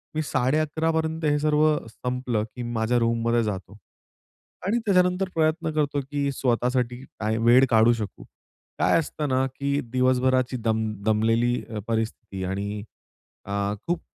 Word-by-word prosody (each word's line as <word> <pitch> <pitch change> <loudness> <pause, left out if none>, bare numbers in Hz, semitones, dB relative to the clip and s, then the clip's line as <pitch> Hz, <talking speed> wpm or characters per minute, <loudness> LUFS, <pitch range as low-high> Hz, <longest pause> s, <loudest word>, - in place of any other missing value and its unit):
मी 155 - +1
11.30 155 +5 +1
पर्यंत 160 0 -1
हे 150 -1 +3
सर्व 150 0 +3
संपलं, 125 -2 -2
की 125 - -5
माझ्या 115 +2 +1
रूममध्ये 115 0 +1
जातो. 100 -1 -5 0.9
आणि 220 +5 +1
त्याच्यानंतर 180 -1 +2
प्रयत्न 160 0 +1
करतो 145 -2 0
की 140 -1 0
स्वतःसाठी 125 0 0 0.2
टाईम, 110 +1 -1
वेळ 125 +3 +7
काढू 115 +1 +5
शकू. 105 -4 -6 0.6
काय - - +4
असतं 150 -2 -3
ना, 130 0 +2
की 140 0 0
दिवसभराची 130 0 +2
दम 110 -1 0 0.2
दमलेली 115 +3 +2
अ, 110 -2 -4
परिस्थिती 110 -4 -3
आणि 100 +2 -3 0.6
अ, 100 +1 -1
खूप 175 -1 0
125 Hz, 135 wpm, -25 LUFS, 110-150 Hz, 0.9 s, वेळ